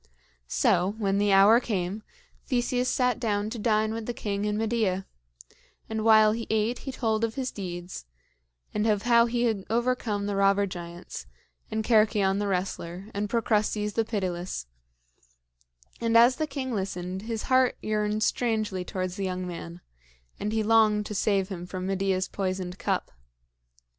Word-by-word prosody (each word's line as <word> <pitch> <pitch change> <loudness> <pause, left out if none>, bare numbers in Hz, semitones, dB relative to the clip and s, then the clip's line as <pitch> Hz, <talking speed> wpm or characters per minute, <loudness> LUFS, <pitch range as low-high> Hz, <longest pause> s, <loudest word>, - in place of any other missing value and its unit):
So, 185 - +2
when 200 -2 +1
the 205 0 +2
hour 200 +4 +7
came, 200 -3 -2 0.5
Theseus 250 -1 0
sat 250 -1 +1
down 210 -2 -1
to 235 - -5
dine 215 0 +1
with 225 -1 -5
the 240 - -3
king 205 -1 -2
and 210 0 -1
Medea; 215 -4 0 0.8
and 220 -1 -3
while 215 -1 +6
he 230 +1 -3
ate 220 +2 +1
he 270 - -6
told 225 -3 -1
of 225 -1 -1
his 260 -2 -2
deeds 175 - -6 0.7
and 210 +1 0
of 210 -2 +1
how 235 0 +5
he 240 0 0
had 220 -5 0
overcome 230 -3 0
the 205 0 -2
robber 200 +1 +3
giants, 175 - -8 0.4
and 220 0 -2
Cercyon 210 -4 +3
the 205 - -1
wrestler, 185 +1 -3
and 205 +1 -2
Procrustes 210 -2 0
the 225 - +1
pitiless; 185 - -3 1.3
and 230 0 +3
as 240 +2 +6
the 310 - -1
king 265 -3 -4
listened, 190 -2 -3
his 225 0 -4
heart 255 -1 +3
yearned 215 0 -1
strangely 215 -7 0
towards 185 +1 -4
the 195 - -2
young 185 0 -3
man, 170 0 -7 0.6
and 210 - -2
he 220 0 0
longed 215 -1 +4
to 210 - -5
save 195 -2 +1
him 180 -2 -6
from 185 0 -5
Medea's 190 -1 0
poisoned 185 -2 -3
cup. - - -1
210 Hz, 160 wpm, -27 LUFS, 190-225 Hz, 1.3 s, hour